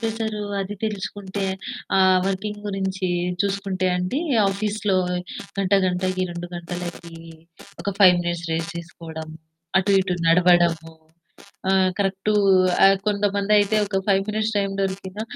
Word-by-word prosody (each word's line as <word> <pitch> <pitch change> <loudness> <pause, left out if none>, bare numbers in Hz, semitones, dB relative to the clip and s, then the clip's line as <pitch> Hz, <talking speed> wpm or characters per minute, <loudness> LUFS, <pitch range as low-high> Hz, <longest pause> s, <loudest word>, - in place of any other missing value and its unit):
Pressure 225 -2 -2 0.2
అది 195 +1 -4
తెలుసుకుంటే, 200 -1 -4 0.5
ఆ - - +5 0.3
వర్కింగ్ 205 +2 -3
గురించి 195 -1 -2 0.4
చూసుకుంటే 195 -2 -1
అండి 180 - -1 0.3
ఆఫీస్‌లో 205 0 -1 0.6
గంట 195 0 -1
గంటకి, 185 +1 -1
2 175 0 -6
గంటలకి 175 -1 -7 0.7
ఒక 200 - -2
5 185 -3 +8
మినిట్స్ 175 -1 -3
రెస్ట్ 165 0 -2
తీసుకోవడం. 165 -1 -9 0.5
అటూ 190 +1 0
ఇటు 185 -1 -1
నడవడము. 170 -1 +3 0.8
ఆహ్, 190 -1 +3
కరెక్టు 195 +1 0 0.5
ఆహ్, 195 0 +6
కొంతమందయితే 205 0 +2
ఒక 195 -1 -1
5 195 -1 +3
మినిట్స్ 215 +1 -1
టైమ్ 200 -1 0
దొరికినా 195 +1 -3
195 Hz, 115 wpm, -23 LUFS, 180-205 Hz, 0.8 s, 5